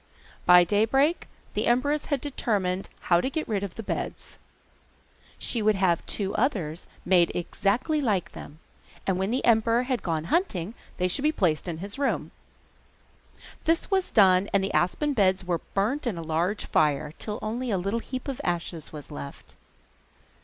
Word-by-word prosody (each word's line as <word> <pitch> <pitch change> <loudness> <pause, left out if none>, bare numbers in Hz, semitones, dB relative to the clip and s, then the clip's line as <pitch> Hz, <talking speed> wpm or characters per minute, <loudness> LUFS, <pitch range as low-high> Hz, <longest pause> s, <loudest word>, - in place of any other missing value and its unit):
By 180 0 +9
daybreak 225 - +2 0.3
the - - 0
empress 285 +5 +2
had 285 -4 -1
determined 200 -9 -1
how 175 -1 +3
to 260 - -1
get 315 +2 -3
rid 210 -3 -1
of 200 -3 -5
the 225 - -6
beds. - - -5 1.0
She 235 - 0
would 215 0 +3
have 185 -3 +2
two 200 -2 -1
others 180 - -1 0.2
made 175 -2 +4
exactly 230 - 0
like 205 -9 0
them, 145 - -10 0.5
and 190 -1 0
when 190 +1 0
the 250 +3 0
emperor 230 +1 +4
had 255 -1 -1
gone 160 -3 -1
hunting 215 - 0 0.2
they 180 - +1
should 180 - 0
be 305 +2 +3
placed 175 - 0
in 170 -2 -3
his 200 - -6
room. 280 - -1 1.3
This 330 +5 +1
was 380 -1 +1
done 190 -2 +5
and 195 - +3
the 195 - -2
aspen 285 - +1
beds 190 -5 +2
were 175 -2 -1
burnt 240 +8 0
in 210 -7 -2
a 165 - -5
large 170 +6 -1
fire, 150 0 +1
till 210 -1 -3
only 240 +4 -2
a 200 - +1
little 200 +6 -1
heap 255 +3 -6
of 275 0 -4
ashes 170 -2 -3
was 150 -3 -9
left. 70 0 -9
200 Hz, 170 wpm, -26 LUFS, 180-255 Hz, 1.3 s, By